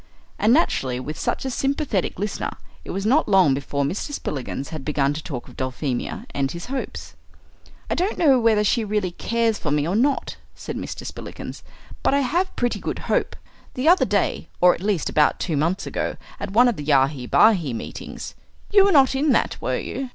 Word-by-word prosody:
And 215 - +4
naturally, 135 - +2
with 150 +4 -6
such - - -2
a 265 - -2
sympathetic 270 - -1
listener, 205 +2 -2 0.3
it - - -12
was 195 +2 -3
not 265 +3 +3
long 190 -8 +5
before 140 +1 -2
Mr. 185 - -3
Spillikins 140 - -4
had 155 -4 -6
begun 145 -1 +1
to 155 - -5
talk 135 -8 -6
of - - -14
Dulphemia 130 0 -3
and 135 -1 -1
his 170 0 -6
hopes. 270 - -5 0.7
"I - - -1
don't 375 +5 -1
know 275 -6 +5
whether 225 -2 +3
she 225 +2 +2
really 210 -3 -1
cares 230 +3 0
for 150 - -3
me 145 +1 +1
or 180 - 0
not," 270 +5 +1 0.2
said - - -6
Mr. - - -6
Spillikins, - - -7 0.4
"but - - +2
I 280 - +3
have 345 +8 0
pretty 245 -1 0
good - - -3 0.2
hope. - - 0 0.4
The 255 +4 -1
other 355 +3 +6
day, - - 0
or 180 0 +6
at - - -8
least 200 -5 0
about 150 -1 +3
two 165 - -1
months 165 +7 0
ago, - - -2 0.2
at - - -4
one 235 +6 +5
of 240 - 0
the 150 - -5
Yahi 135 -3 +2
Bahi 185 - +4
meetings 115 - -7 0.4
you 405 -1 +7
were 400 - +4
not 275 -5 +5
in 275 +1 +2
that, - - +1
were - - -1
you?" 265 -1 -4
195 Hz, 200 wpm, -23 LUFS, -, 0.7 s, you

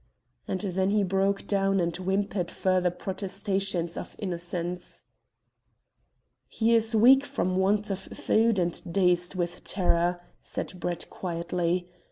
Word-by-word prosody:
And 185 - -2
then 190 -1 0
he 205 0 +3
broke 195 +1 +1
down 195 -1 +2
and 170 -1 0
whimpered 190 0 -1
further 185 -1 +1
protestations 190 -1 -2
of - - -7
innocence. 175 -2 -4 1.4
"He 230 +1 +1
is 225 0 +3
weak 260 +5 +7
from 185 -9 -1
want 205 +2 +2
of 195 - -2
food, 225 -1 +1
and 175 -1 0
dazed 180 -1 +2
with 175 -1 -3
terror," 175 -1 +1 0.2
said 180 - -5
Brett 175 -1 -3
quietly. 175 0 -2
185 Hz, 125 wpm, -27 LUFS, 175-200 Hz, 1.4 s, weak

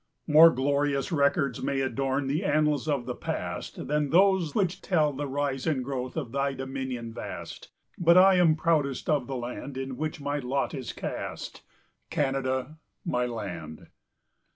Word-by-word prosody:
More 160 +2 +8
glorious 140 +1 0
records 140 -3 +1
may 140 -1 -1
adorn 135 +1 -1
The 145 +7 -1
annals 150 -5 +1
of 140 -5 0
the 125 - -3
past - - -5
Than 150 0 0
those 185 -2 +3
which 190 -2 0
tell 155 -5 +2
the 145 +2 -4
rise 140 0 -2
and 140 -5 +1
growth 130 -2 -4
Of 115 - -3
thy 140 +1 0
dominion 130 -3 -5
vast; - - -7 0.3
But 170 +1 +5
I 190 0 +7
am 165 -3 +5
proudest 155 -4 0
of 145 -5 +1
the 135 - -4
land 125 +2 -6
In 135 -1 -4
which 155 0 -3
my 145 +1 -2
lot 135 +1 -1
is 130 -4 -5
cast, - - -6 0.5
Canada, 135 +1 -1 0.3
my 125 -7 0
land. 90 -9 -7
140 Hz, 155 wpm, -27 LUFS, 130-155 Hz, 0.5 s, More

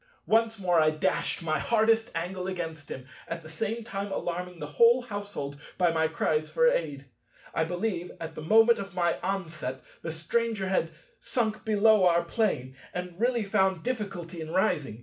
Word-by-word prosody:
Once 225 0 +3
more 180 -3 +2
I 155 0 +5
dashed 155 +2 -1
my 155 -2 0
hardest 225 +4 +3
angle 180 +2 -3
against 165 -5 -5
him, 130 - -6 0.2
at 165 0 -5
the 155 - -10
same 220 +7 -3
time 200 -2 -4
alarming 180 0 -3
the 150 - -5
whole 235 +11 +5
household 205 - -5 0.2
by 175 -2 +3
my 160 -1 +2
cries 155 -1 0
for 240 +10 +3
aid. 145 - 0 0.5
I 160 - +1
believe, 180 +1 -2
at 165 0 -6
the 155 - -7
moment 225 +8 +5
of 195 -1 -7
my 175 -2 +1
onset, 165 -9 -3 0.2
the 165 - -4
Stranger 195 +5 -1
had 185 -3 +1 0.3
sunk 230 -2 -1
below 215 -2 +5
our 170 0 +3
Plane, 170 - -1 0.2
and 180 0 -4
really 240 -1 +2
found 190 -3 +1
difficulty 195 -9 -4
in 155 - -6
rising. 155 - 0
180 Hz, 170 wpm, -28 LUFS, 160-215 Hz, 0.5 s, I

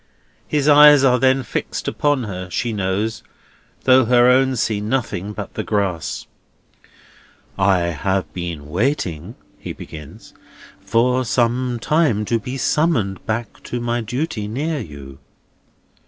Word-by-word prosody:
His 150 -1 0
eyes 150 -1 +8
are 125 -2 +4
then 130 +1 +3
fixed 110 - -4
upon 145 -3 0
her, 90 -4 -6
she 115 +5 -2
knows, 105 +2 -2 0.6
though 130 -1 +5
her 120 +1 +5
own 130 +1 +4
see 110 -3 -1
nothing 105 -4 -2
but 105 -1 -7
the - - -3
grass. 95 -7 -2 1.3
"I 95 -2 +3
have 95 +2 -2
been 85 -5 -5
waiting," 95 - -2 0.2
he - - -6
begins, 75 -2 -11 0.5
"for 120 +6 +1
some 120 +1 0
time, 130 -6 +1
to 115 +2 0
be 125 +5 -6
summoned 125 - 0
back 115 +1 -3
to 120 - -4
my 120 0 -1
duty 120 -1 -3
near 145 +8 -2
you." 70 - -10
115 Hz, 130 wpm, -20 LUFS, 95-130 Hz, 1.3 s, eyes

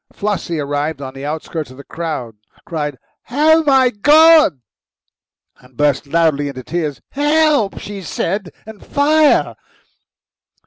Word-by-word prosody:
Flossie, 195 -5 -3
arriving 145 0 -3
on 130 - -8
the 135 - -9
outskirts 155 0 -5
of 130 - -14
the 140 - -11
crowd, 150 -10 -5 0.3
cried, 150 -5 -4 0.3
"Oh, 315 +5 +3
my 265 -3 +4
God!" 305 - +5 1.0
and 125 -1 -22
burst 145 -1 +1
loudly 155 -2 +1
into 130 -2 -7
tears. 155 -3 -4
"Help!" 295 -6 +1
she 200 -1 -7
said, 185 +2 -3 0.2
and 220 -1 -12
"Fire!" 300 +1 +2
170 Hz, 125 wpm, -17 LUFS, -, 1.0 s, God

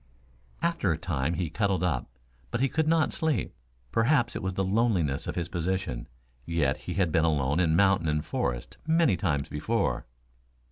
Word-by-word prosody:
After 170 - +1
a 80 - 0
time 80 -1 -1
he 80 -1 -2
cuddled 100 -1 0
up, 65 -10 -1 0.4
but 130 - 0
could 160 -1 +1
not 160 -1 +3
sleep. 155 - -1 0.4
Perhaps 120 +1 +2
it - - -3
was 95 0 -2
the 95 - +1
loneliness 95 - +1
of - - -3
his 85 -1 -2
position. 85 -7 -2 0.4
Yet 75 -2 +1
he 90 - -6
had 90 -3 +1
been 80 0 +3
alone 75 -2 +1
in 80 -3 +3
mountain 95 -2 +3
and 75 0 0
forest - - -3
many 160 - +4
times 75 -5 -1
before. 75 0 -1
90 Hz, 170 wpm, -28 LUFS, 75-110 Hz, 0.4 s, many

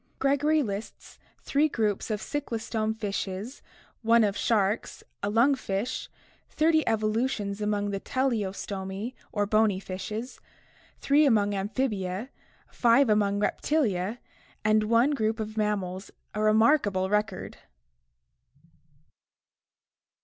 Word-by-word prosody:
Gregory 290 +3 +2
lists 205 -1 -7 0.2
three 295 +2 +2
groups 215 -6 -1
of 215 -1 -1
cyclostome 225 -4 -3
fishes, 205 +3 -4 0.4
one 230 0 +5
of 205 -1 +1
sharks, 210 -2 0 0.2
a 200 - -1
lung 235 +7 +4
fish, 220 -2 -3 0.4
thirty 315 0 +3
evolutions 215 -1 0
among 205 -1 0
the 195 - -2
Teleostomi 200 -3 -2 0.2
or 205 -1 0
bony 215 -2 +2
fishes, 205 +6 -6 0.6
three 290 +2 +3
among 210 -7 +3
Amphibia, 200 +1 -2 0.4
five 240 0 +4
among 205 -1 +2
Reptilia, 210 - 0 0.5
and 215 0 +3
one 235 +6 +3
group 225 -5 0
of 215 0 -4
mammals, 200 -3 -2 0.2
a 215 - -2
remarkable 215 -3 +3
record. 210 -1 -2
215 Hz, 105 wpm, -27 LUFS, 200-240 Hz, 0.6 s, one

